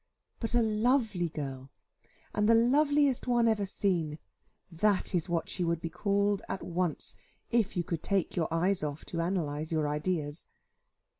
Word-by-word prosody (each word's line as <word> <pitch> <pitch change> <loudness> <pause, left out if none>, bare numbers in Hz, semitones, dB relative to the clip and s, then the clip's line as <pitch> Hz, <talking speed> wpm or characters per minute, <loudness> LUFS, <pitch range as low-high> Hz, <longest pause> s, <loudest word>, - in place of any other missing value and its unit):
But 230 0 -1
a 240 - +5
"lovely 220 -4 +1
girl," 135 -3 -6 0.6
and 210 +1 +2
the 230 - +7
loveliest 280 +2 +3
one 240 -1 +3
ever 210 -3 +1
seen, 170 -6 0 0.5
that 195 +4 +1
is 175 0 0
what 170 -1 0
she 180 - -2
would 170 -1 0
be 165 0 -5
called 200 0 +1
at 190 - -3
once, 175 -1 -1 0.4
if 230 -6 +1
you 175 - +1
could 165 -1 -3
take 195 -3 0
your 165 -3 0
eyes 180 +4 +1
off, 150 0 -4
to 170 - -4
analyse 160 -3 -1
your 155 -2 +1
ideas. 150 0 -2
185 Hz, 160 wpm, -30 LUFS, 160-215 Hz, 0.6 s, the